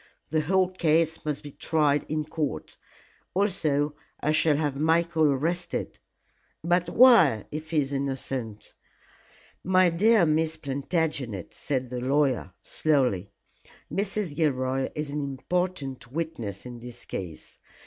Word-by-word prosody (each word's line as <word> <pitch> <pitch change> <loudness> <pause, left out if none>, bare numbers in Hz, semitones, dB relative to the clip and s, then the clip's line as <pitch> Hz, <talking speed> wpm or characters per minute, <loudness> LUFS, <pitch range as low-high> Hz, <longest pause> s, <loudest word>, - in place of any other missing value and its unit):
The 155 0 +1
whole 185 +4 +2
case 160 -3 +1
must 150 -2 -2
be 145 - -8
tried 150 -1 +1
in 155 0 -1
court. 150 - -4 0.6
Also 155 -7 +1 0.2
I 150 - +1
shall 155 -1 +3
have 145 -3 -1
Michael 165 +1 +2
arrested." 165 +6 -2 0.6
"But 175 +1 +2
why, 190 - +6
if 155 +1 -6
he 155 -2 +2
is 140 0 -4
innocent?" 135 -5 -4 0.9
"My 185 -1 +4
dear 210 +3 +4
Miss 160 +1 +1
Plantagenet," 140 - -2
said 130 -3 -3
the 125 - -3
lawyer, 135 -6 +1
slowly, 125 - +1 0.6
"Mrs. 195 -5 -1
Gilroy 135 -3 0
is 150 -1 -3
an 150 +1 -2
important 140 -2 -3
witness 130 - -4
in 120 -1 -8
this 120 0 -10
case. 85 -4 -7
150 Hz, 125 wpm, -26 LUFS, 135-165 Hz, 0.9 s, why